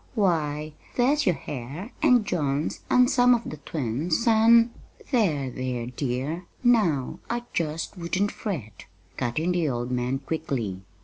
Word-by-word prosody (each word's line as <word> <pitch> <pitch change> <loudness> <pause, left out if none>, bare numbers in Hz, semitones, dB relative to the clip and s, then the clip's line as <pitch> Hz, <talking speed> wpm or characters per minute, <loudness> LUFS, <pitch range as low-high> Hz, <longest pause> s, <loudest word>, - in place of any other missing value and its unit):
Why, 155 -7 0 0.2
there's 275 +2 +2
your 180 - +4
hair, 145 - -7
an' 250 -7 +5
John's, 150 -6 -1
an' 250 0 +5
some 250 -2 +5
of 235 - -3
the 155 - -6
twins', 155 - -2
an' 230 +1 +6 0.2
" - - -22
"There, 155 - +1
there, 125 -2 -3
dear; 140 +7 -2 0.2
now 200 - +2
I 240 +1 -2
jest 160 +3 -2
wouldn't 185 +4 0
fret," 125 - -6 0.3
cut 120 -2 -2
in 165 +3 +1
the 175 -4 +1
old 120 -1 -3
man 125 +1 0
quickly. 135 - -3
160 Hz, 145 wpm, -26 LUFS, 135-220 Hz, 0.3 s, an